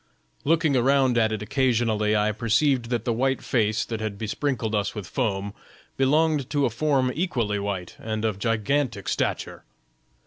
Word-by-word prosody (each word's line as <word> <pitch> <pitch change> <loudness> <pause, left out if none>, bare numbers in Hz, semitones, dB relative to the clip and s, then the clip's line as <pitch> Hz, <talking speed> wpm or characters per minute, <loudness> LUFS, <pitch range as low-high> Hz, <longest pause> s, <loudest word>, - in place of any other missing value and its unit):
"Looking 160 -1 +2
around 130 0 +3
at 110 -1 +2
it 105 -1 -3
occasionally, 110 -4 +1
I 105 0 +2
perceived 115 +3 +1
that 120 -3 -1
the 120 - +1
white 130 +3 0
face 110 -2 +1
that 110 -2 -4
had 110 -2 -3
besprinkled 115 +1 -2
us 105 0 -1
with 105 -3 -5
foam 100 -4 -2 0.4
belonged 150 +1 +2
to 145 -2 +1
a 120 - 0
form 130 0 +1
equally 120 - -1
white 100 -3 -4
and 110 0 -3
of 105 -3 -1
gigantic 115 0 0
stature. - - -2
115 Hz, 160 wpm, -25 LUFS, 105-135 Hz, 0.4 s, around